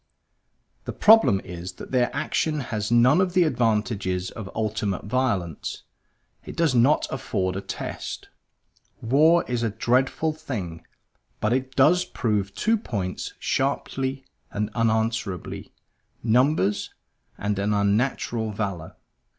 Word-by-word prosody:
The - - -4
problem 215 - +6
is 90 +1 -7
that - - -11
their 125 -2 +2
action 155 +1 -1
has 105 -1 -1
none 125 +8 +5
of 185 -1 -1
the 180 - +6
advantages 105 - 0
of 110 -5 -7
ultimate 110 -3 -2
violence; 105 - -2 0.6
it - - -9
does 165 -5 +2
not 125 +5 +4
afford 95 -1 -2
a 95 - -3
test. - - -6 0.7
War 155 +8 +4
is 120 -2 -1
a 115 - +1
dreadful 130 +8 +1
thing; 105 - -6 0.6
but 110 +2 +1
it 130 +1 -2
does 165 +7 +5
prove 105 - -2
two 225 - +1
points 100 - -4
sharply 135 0 -1 0.2
and 105 +1 -3
unanswerably 110 -4 -1 0.5
numbers, 120 -3 +2 0.5
and 105 0 -2
an 100 +1 0
unnatural 110 +2 0
valor. 100 -6 -4
115 Hz, 120 wpm, -25 LUFS, 100-135 Hz, 0.7 s, problem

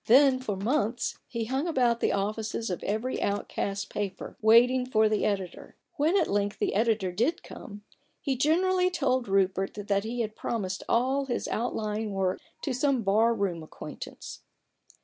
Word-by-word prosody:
Then 265 +2 +6
for 220 -6 -3
months 235 +3 -1
he 230 -2 -3
hung 265 +7 -1
about 245 -7 +2
the - - +1
offices 215 +2 -2
of 180 - -3
every 220 +5 -2
outcast 200 0 -2
paper, 205 -2 -4
waiting 240 +4 +6
for 220 -4 +3
the 215 0 +1
editor. 195 -4 -3 0.2
When 315 +6 +3
at 340 - +1
length 205 0 0
the - - 0
editor 215 -3 +1
did 240 - 0
come, 205 0 -10 0.4
he 275 -3 -1
generally 360 +7 +3
told 260 -8 0
Rupert 195 0 +1
that 200 -1 0
he 235 +2 -3
had 215 -1 -3
promised 190 -5 -3
all 265 +4 +2
his 245 -3 -2
outlying 215 -2 -2
work 190 -1 0 0.2
to 275 - -1
some 265 -1 +1
bar 215 +4 +4
room 190 -6 -1
acquaintance. 155 - -9
225 Hz, 160 wpm, -28 LUFS, 200-255 Hz, 0.4 s, Then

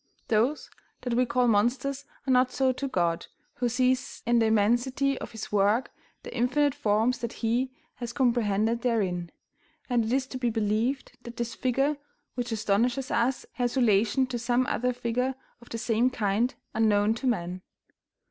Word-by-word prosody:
Those 235 +7 +1 0.3
that 245 - -2
we 250 +1 +2
call 250 0 +2
monsters 245 +6 +1 0.2
are 265 - +1
not 255 0 +4
so 265 0 +2
to 275 +2 -3
God, 170 -8 0 0.3
who 245 -1 0
sees 255 +1 0
in 235 0 +3
the 225 - +3
immensity 240 +6 +2
of - - -6
His 225 -2 -7
work 210 +5 +2 0.3
the - - -8
infinite 260 +4 +2
forms 220 +4 +1
that 235 -1 -4
He 245 +3 0 0.3
has 240 -1 -5
comprehended 235 -3 +1
therein; 190 -8 0 0.6
and 240 -2 +3
it 220 - -2
is 265 +1 +1
to 260 0 -7
be 245 -2 +1
believed 225 +4 -1
that 235 -1 -10
this 235 0 -3
figure 270 +3 0 0.4
which 245 -1 -3
astonishes 225 +5 0
us 250 +2 +1
has 245 +1 -2
relation 230 +2 +3
to 250 -2 -4
some 245 +2 +1
other 250 +1 0
figure 250 +2 -1 0.3
of 240 - -16
the 230 - -4
same 230 +2 +2
kind 225 +1 0 0.2
unknown 215 -1 +3
to 250 +3 -3
man. 180 -5 -1
240 Hz, 165 wpm, -27 LUFS, 220-255 Hz, 0.6 s, not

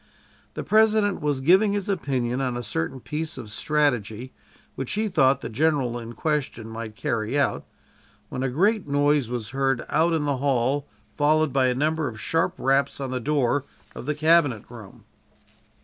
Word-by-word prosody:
The - - -4
President 215 -2 +3
was 145 -3 -1
giving 190 +8 +4
his 205 -2 -2
opinion 135 -9 -1
on 125 -2 -1
a 120 - -4
certain 105 +4 -3
piece 155 +5 -4
of 105 - -8
strategy 125 -4 -1 0.4
which 135 - -4
he 215 +1 0
thought 140 -8 +3
the - - -4
general 130 -2 0
in 115 0 -8
question 145 -6 -2
might 110 -1 -7
carry 115 +4 -2
out 140 - 0 0.6
when 125 - -4
a 135 - 0
great 195 - +1
noise 145 -2 +2
was 120 -4 -4
heard 135 -2 0
out 165 +2 +2
in 155 -2 0
the 140 -2 0
hall, 135 +1 0 0.3
followed 155 -1 +2
by 130 -1 +3
a 125 - +1
number 155 +2 0
of 110 -3 -7
sharp 170 +3 0
raps 135 +2 +1
on 135 -2 -4
the 130 - -2
door 140 0 +1 0.3
of - - -9
the 150 - 0
cabinet 155 -7 +3
room. 110 -5 -12
140 Hz, 175 wpm, -24 LUFS, 125-155 Hz, 0.6 s, giving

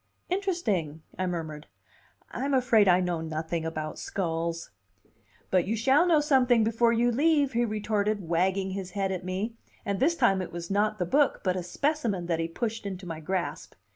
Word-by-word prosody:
"Interesting," 215 - -1 0.2
I 185 - 0
murmured. 160 -4 -5 0.6
"I'm 275 0 -1
afraid 240 -5 +4
I 180 0 +5
know 175 -2 -1
nothing 160 +1 -3
about 155 -1 -4
skulls." 165 - -3 0.8
"But 185 -2 +2
you 220 - 0
shall 270 +9 +3
know 320 -4 +4
someding 255 -6 +4
before 230 +1 +2
you 235 +1 +2
leave," 290 +2 +3
he 240 +1 +2
retorted, 210 -3 -1
wagging 190 +3 +1
his 190 -1 -5
head 195 -1 0
at 185 -1 -3
me; 195 +5 -3 0.3
and 200 -1 -1
this 320 +7 +3
time 195 - +3
it 185 - -6
was 170 +1 -6
not 210 +2 +1
the 180 - -1
book, 285 - +2
but 185 -2 +1
a 185 - -2
specimen, 225 - -1
that 170 -1 -1
he 165 - 0
pushed 225 +4 -4
into 190 -1 -6
my 165 -2 -5
grasp. 185 +3 -3
195 Hz, 180 wpm, -28 LUFS, 175-240 Hz, 0.8 s, I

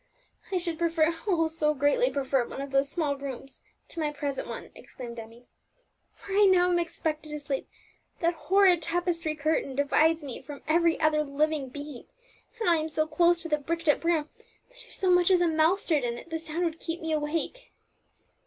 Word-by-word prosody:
"I 375 - +1
should 340 -2 -3
prefer 330 -1 +2
oh, 340 -5 +3
so 315 -1 0
greatly 290 - +2
prefer 265 -3 0
one - - -8
of 275 0 -5
those 275 +1 +2
small 300 -3 -1
rooms 270 -1 -8 0.3
to - - -7
my 300 -2 0
present 285 -2 -4
one!" - - -7
exclaimed 240 -3 -9
Emmie. 230 +2 -12 0.8
"Where 395 0 0
I - - +8
now 360 -2 +4
am 350 - +3
expected 315 -2 -3
to 300 0 -5
sleep, 280 -2 -4 0.5
that 340 0 +2
horrid 370 0 +4
tapestry 335 -1 -1
curtain 300 -3 -1
divides 310 +3 +2
me 270 -4 -6
from 280 +1 -10
every 335 +1 +3
other 310 -1 +3
living 295 -1 -1
being, 285 -1 -8 0.5
and 445 - -1
I 340 -1 +5
am 315 0 -2
so 310 0 0
close 340 +2 +2
to - - -4
the 300 -2 +1
bricked 330 +3 -3
up 295 - +3
room, 330 -3 +1 0.4
that - - -16
if - - -13
so 375 -2 +1
much 355 0 +4
as 370 -2 +5
a 350 - +3
mouse 320 +4 +2
stirred 300 -6 +1
in 235 -1 -2
it, 335 - -12
the 325 - -2
sound 320 +2 -3
would 330 -1 -3
keep 330 0 -4
me 320 -1 -4
awake. 310 +11 -2
315 Hz, 200 wpm, -28 LUFS, 290-340 Hz, 0.8 s, I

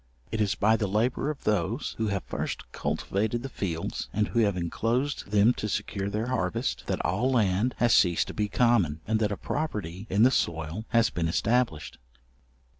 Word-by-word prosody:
It 110 0 -1
is 100 -3 +1
by 110 +2 +3
the 105 - -1
labour 115 +8 0
of 150 - -5
those 105 +4 0
who 110 - +1
have 100 -3 -1
first - - -5
cultivated 110 +4 -2
the 135 - -5
fields, 85 -9 -4
and 105 0 0
who 120 - 0
have 100 -4 +2
inclosed 115 - -1
them 105 +4 +4
to 105 - -4
secure 100 0 -2
their 105 +3 -2
harvest, 105 -9 -2
that - - -1
all 105 +11 +1
land 110 0 +2
has 120 -1 +3
ceased 85 -3 +4
to - - -5
be 105 -1 -1
common, 100 -11 +2
and 110 +1 +1
that 105 -1 +1
a 100 - -2
property 105 - -4
in 100 +3 +3
the 130 - +6
soil 80 - -1
has 115 -2 +3
been 85 -1 -1
established. 110 -2 0
105 Hz, 190 wpm, -27 LUFS, 95-120 Hz, -, the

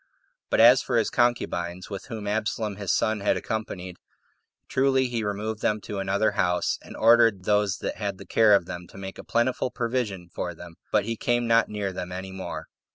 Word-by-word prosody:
But - - +1
as 120 +3 +8
for 120 - 0
his 115 - +1
concubines, 90 -7 0
with 100 - -6
whom 110 -5 -6
Absalom 105 0 -2
his 100 -3 -1
son 110 -1 +1
had 100 - +1
accompanied, 95 -5 -5 0.7
truly 130 0 +2
he 120 -3 -2
removed 105 +1 -3
them 105 0 +1
to 100 -1 -5
another 100 +3 +1
house, 90 -3 0
and - - -11
ordered 115 -4 +5
those 105 -1 +2
that - - -3
had 100 -3 -3
the 100 - -11
care 110 -2 +5
of 95 - +1
them 90 -1 -7
to - - -15
make 95 0 -7
a - - -8
plentiful 125 +2 0
provision 115 -8 -2
for 90 -1 -4
them, 85 +1 -11 0.2
but - - +2
he 115 +1 -2
came 120 +2 0
not 115 0 +3
near 100 -2 -3
them 90 0 -5
any 95 +1 -6
more. 95 0 -6
105 Hz, 200 wpm, -26 LUFS, 95-115 Hz, 0.7 s, as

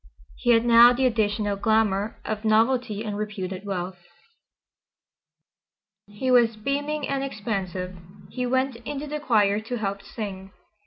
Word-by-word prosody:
He - - -3
had 230 0 +5
now 240 +1 +8
the 260 +2 +1
additional 210 -3 +1
glamour 215 -1 +1
of 215 0 -3
novelty 225 0 +2
and 210 -2 -4
reputed 200 -2 -5
wealth. 180 -1 -4 2.1
He 205 +6 -2
was 235 -2 +4
beaming 285 +6 -2
and 275 -1 -1
expansive. 190 -7 -4 0.4
He 250 -1 -2
went 260 0 0
into 280 +5 -6
the 300 0 -4
choir 210 -7 +2
to 230 +3 -5
help 200 -2 -3
sing. 195 -2 -7
220 Hz, 135 wpm, -25 LUFS, 200-250 Hz, 2.1 s, now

